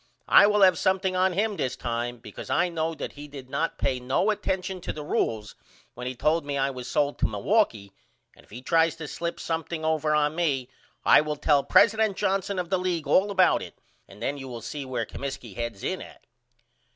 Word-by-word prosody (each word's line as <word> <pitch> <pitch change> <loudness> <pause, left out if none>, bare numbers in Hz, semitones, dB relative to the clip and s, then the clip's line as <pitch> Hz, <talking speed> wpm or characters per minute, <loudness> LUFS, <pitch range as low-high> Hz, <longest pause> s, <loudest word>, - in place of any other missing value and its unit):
I - - +8
will 210 -1 +4
have 185 -3 +5
something 190 0 +1
on 185 0 +2
him 210 +3 0
this 130 - -2
time 120 +1 -3
because 115 - -10
I 175 +1 +2
know 165 -1 -2
that - - -5
he 145 +1 -10
did 135 -3 -11
not 165 - -1
pay 130 - 0
no 130 +12 +1
attention 190 -2 -3
to - - -3
the 150 - -7
rules 110 -7 -1 0.4
when 125 +1 -6
he 130 - -4
told 155 +6 +1
me 145 -1 -3
I 135 0 +1
was 125 -2 -7
sold 145 0 0
to - - +2
Milwaukee 110 - 0 0.4
and - - -19
if - - -25
he 120 +4 -10
tries 165 +1 +3
to 160 -2 -7
slip 170 +3 -4
something 160 0 -3
over 155 -1 +1
on 150 0 +2
me 145 -7 -1 0.4
I - - +7
will 150 0 -3
tell 145 -1 +2
president 220 -2 +4
Johnson 195 0 0
of 180 -1 -3
the 190 - +2
league 175 -4 -1
all 190 +8 +3
about 185 -3 +3
it - - -10 0.3
and 105 - -12
then 140 +3 -2
you 135 - -7
will 120 -2 -7
see 145 +4 -6
where 125 -3 -2
Comiskey 135 -5 -7
heads 115 -3 -5
in 185 - -2
at. - - -13
150 Hz, 215 wpm, -26 LUFS, 130-185 Hz, 0.4 s, I